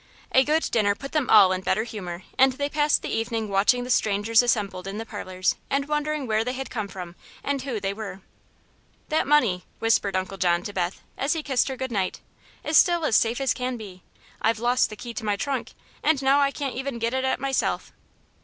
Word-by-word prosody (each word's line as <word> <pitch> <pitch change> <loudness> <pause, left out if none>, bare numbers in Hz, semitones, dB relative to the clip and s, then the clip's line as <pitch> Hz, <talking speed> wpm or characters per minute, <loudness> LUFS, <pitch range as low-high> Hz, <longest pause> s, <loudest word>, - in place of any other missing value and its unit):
A 260 - +5
good 310 +3 +1
dinner 205 -3 +2
put 275 +5 -8
them 300 -5 0
all 200 -4 +7
in 185 0 -1
a - - -21
better 215 +4 +1
humor 190 -6 -7
and 265 0 +5
they 285 +2 -2
passed 295 0 +2
the - - -4
evening 225 -1 -2
watching 205 +6 +3
the 250 - -4
strangers 220 +1 +3
assembled 200 -6 -1
in 195 +1 -5
the 225 - -5
parlors 185 -5 -2
and 275 +1 0
wondering 300 -1 -1
where 220 -1 +1
they 250 +2 -3
had 265 +1 -6
come 215 -4 -3
from 180 -2 -8 0.3
and 280 -1 -1
who 255 -5 -3
they 195 0 -2
were. 200 -3 -7 0.9
"That 310 -3 +1
money," 240 -12 +3
whispered 215 -4 +1
Uncle 190 +1 -3
John 175 -1 +2
to 205 - -6
Beth, 180 -1 -2 0.2
as 280 +4 +1
he 320 -2 -3
kissed 265 -4 +1
her 265 -1 -4
good 260 -1 -4
night, 195 -4 -1 0.4
"is 310 - +3
still 345 -3 +4
as 225 - +2
safe 230 +2 +2
as 270 -1 +1
can 250 0 -3
be. 195 -5 -10 0.4
I've 225 0 +2
lost 245 +3 +2
the 215 - -8
key 235 +2 -8
to 220 - -6
my 210 -1 +1
trunk, 270 +6 -3 0.3
and 315 -3 +2
now 270 +2 +4
I 280 -1 +3
can't 275 -1 -4
even 265 -1 -4
get 230 +1 -1
at 260 0 0
it 265 - 0
myself." 270 0 -1
230 Hz, 225 wpm, -25 LUFS, 200-270 Hz, 0.9 s, all